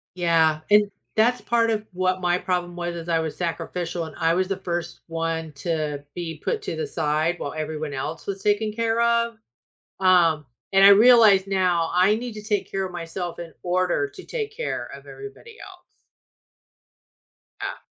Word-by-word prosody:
Yeah. 165 -3 +3
And 205 -1 +5 0.2
that's 240 +3 +3
part 230 -1 +2
of 215 -1 -1
what 185 0 0
my 175 0 +2
problem 180 -1 -2
was, 175 0 -4
as 170 0 -7
I 165 -1 +2
was 160 -2 -3
sacrificial 170 0 -3
and 155 - -10
I 165 0 +3
was 185 +1 +1
the 195 -1 -2
first 175 -2 -4
one 165 -1 -3
to 150 -2 -3
be 165 -3 -5
put 450 -3 -1
to - - -4
the 465 -2 -3
side 155 - 0
while 140 - -4
everyone 155 -1 -4
else 140 +4 -5
was 195 -1 -4
taken 210 +1 +1
care 230 +1 0
of. 235 0 +2 0.6
Um, 170 -5 +4 0.3
and 195 0 +7
I - - +10
realized 210 -3 +7
now 180 -4 +1
I 185 +4 +4
need 240 0 -5
to 210 0 -9
take 210 -2 -1
care 195 -1 -1
of 185 - -7
myself 175 0 -5
in 170 -1 -8
order 185 - +1
to 375 - -10
take 440 -3 -4
care - - -3
of - - -14
everybody 420 +2 -11
else. - - -14 1.8
Yeah. - - -5
180 Hz, 175 wpm, -24 LUFS, 165-215 Hz, 1.8 s, I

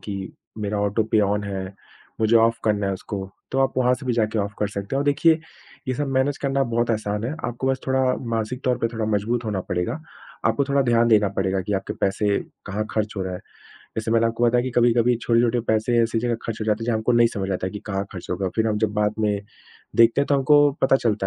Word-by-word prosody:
कि, 105 - -6 0.5
"मेरा 105 0 -2
ऑटो 105 +2 +1
पे 110 - +5
ऑन 105 0 +1
है। 100 -1 -3 0.6
मुझे 110 +1 +4
ऑफ 115 0 +3
करना 105 -2 +1
है 100 - 0
उसको।" 100 +2 -5 0.3
तो 135 - 0
आप 135 0 +2
वहाँ 125 0 +3
से 130 +2 -10
भी 125 - +1
जाके 110 -1 0
ऑफ 100 0 -1
कर 105 - 0
सकते 100 +5 -4
हैं। - - +1
और 140 - 0
देखिए, 155 +3 +4 0.5
ये 130 - 0
सब 145 +3 -2
मैनेज 135 +2 +1
करना 140 -1 0
बहुत 120 0 +1
आसान 105 -1 -1
है। 130 +6 -2
आपको 120 +2 -3
बस 135 -1 0
थोड़ा 130 0 +2 0.3
मानसिक 115 +3 -2
तौर 125 -1 +1
पे 115 - 0
थोड़ा 115 -2 -2
मज़बूत 115 +4 -1
होना 105 -3 -2
पड़ेगा। 90 - -1 0.5
आपको 140 - +1
थोड़ा 140 0 +3
ध्यान 120 -2 +3
देना 105 -3 +4
पड़ेगा 95 0 +1
कि 105 - -4
आपके 100 - -6
पैसे 100 +2 +1 0.4
कहाँ 105 +3 -2
खर्च 110 -1 -2
हो 95 - -1
रहा 95 0 -4
है। 90 - -7 0.6
जैसे 110 0 -2
मैंने 115 0 +3
आपको 115 +1 0
बताया 120 +1 +3
कि 130 - -2
कभी-कभी 120 0 +4
छोटे-छोटे 120 0 +2
पैसे 110 +2 +1
ऐसी 115 0 0
जगह 120 +1 0
खर्च 115 -1 -4
हो - - -1
जाते 110 +1 0
हैं, - - -4
जहाँ 120 -2 +1
हमको 110 +3 0
नहीं 120 -1 +5
समझ 100 -2 -2
आता 95 0 -2
कि 105 - -7
कहाँ 100 -2 -2
खर्च 90 - -8
हो 90 - 0
गया। 95 +1 -1
फिर 110 0 +2
हम 105 -1 0
जब 110 -1 0
बाद 105 0 +1
में 105 -2 +1 0.6
देखते 115 +3 +5
हैं, 140 - +1
तो 145 - +2
हमको 145 +2 +5
पता 135 - +5
चलता 110 -6 0
115 Hz, 250 wpm, -23 LUFS, 105-125 Hz, 0.6 s, पे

